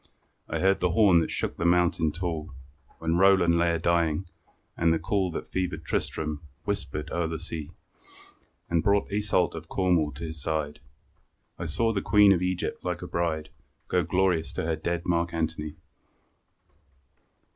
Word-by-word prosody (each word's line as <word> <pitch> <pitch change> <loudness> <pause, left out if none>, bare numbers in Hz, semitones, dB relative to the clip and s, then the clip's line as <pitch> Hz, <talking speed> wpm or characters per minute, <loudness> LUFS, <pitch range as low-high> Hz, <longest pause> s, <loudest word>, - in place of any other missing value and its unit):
I - - -1
heard 95 +1 +3
the 90 -1 +1
horn 100 -6 +6
that 80 - -1
shook - - -2
the - - -2
mountain 85 -2 +3
tall, 80 -4 -4 0.4
When 80 +1 0
Roland 90 -3 +5
lay 85 0 +2
a - - +1
dying, 85 0 +1 0.5
and 85 0 +2
the 80 - +3
call 95 +3 0
That 85 - -5
fevered 90 -4 -3
Tristram 75 0 -2 0.2
whispered 80 -7 -3
o'er 85 -1 0
the 80 0 -3
sea, 80 -2 -6 1.0
And 85 -1 +1
brought 100 +1 +2
Iseult 100 -4 +1
of 80 0 -8
Cornwall 90 -5 +2
to 70 - -8
his 80 -2 -6
side. 75 -1 -2 0.8
I 85 - -3
saw 115 +8 +1
the 100 - -1
Queen 105 -1 +6
of 90 - 0
Egypt 90 0 -2
like - - -3
a - - -5
bride 80 -3 -2 0.4
Go 90 - +3
glorious 90 -1 +1
to - - -3
her 80 0 0
dead 85 +2 -2
Mark 85 -1 0
Antony. 80 -2 -2
85 Hz, 165 wpm, -27 LUFS, 80-90 Hz, 1.0 s, horn